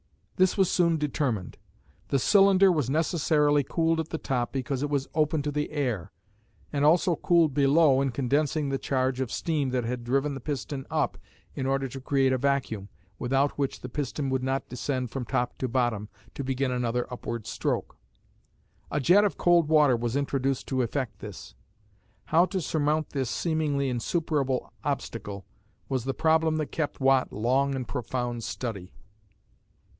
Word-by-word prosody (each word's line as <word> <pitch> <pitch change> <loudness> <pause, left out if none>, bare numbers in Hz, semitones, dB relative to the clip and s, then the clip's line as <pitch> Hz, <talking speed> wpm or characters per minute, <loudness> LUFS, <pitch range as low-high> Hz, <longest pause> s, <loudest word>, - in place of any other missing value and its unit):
This 185 +2 +3
was 190 -2 +3
soon 170 -2 +3
determined. 140 -9 -2 0.5
The 140 - +1
cylinder 195 +4 +5
was 150 -7 0
necessarily 150 -1 +2
cooled 165 +3 +1
at 160 - -3
the 160 - -3
top 125 -5 -2
because 135 0 -2
it 145 - -1
was 140 -2 -1
open 155 -1 +1
to 145 - -2
the 150 +1 -2
air, 125 - -2 0.6
and 145 -1 0
also 170 +3 +4
cooled 165 -3 +3
below 140 0 +4
in 135 - +1
condensing 140 +4 0
the 135 -1 -1
charge 130 -1 0
of 130 - -2
steam 150 -5 -1
that 125 -1 -1
had 120 +1 -3
driven 135 +4 0
the 135 - -5
piston 135 0 -4
up - - -1 0.3
in 130 - -3
order 135 0 0
to 135 +2 -8
create 135 0 +2
a 130 - 0
vacuum, 125 -7 -1 0.3
without 135 +3 0
which 140 -1 -2
the 125 - -6
piston 140 0 -3
would 130 0 0
not 135 +1 -2
descend 125 -1 -3
from 135 - -3
top 120 +1 -1
to 130 - -1
bottom, 120 -4 0 0.2
to 140 - -5
begin 135 0 -1
another 125 -1 -1
upward 115 -2 -5
stroke. - - -2 0.9
A 150 - -1
jet 180 +9 +5
of 205 - 0
cold 175 -3 +4
water 150 -4 +5
was 120 +1 -2
introduced 135 -2 -1
to 130 -1 +1
effect 120 -3 -3
this. 105 -4 -9 0.7
How 165 +3 +4
to 190 - -2
surmount 155 -1 0
this 135 -4 -2
seemingly 155 -4 0
insuperable 135 +1 -1
obstacle 100 -1 -4 0.4
was 130 -3 -1
the 135 - -2
problem 160 0 +2
that 155 -2 -2
kept 155 -3 -3
Watt 135 -1 +3
long 135 +5 +1
in 130 -2 -3
profound 120 -2 -3
study. 100 -8 -5
135 Hz, 170 wpm, -27 LUFS, 125-150 Hz, 0.9 s, cylinder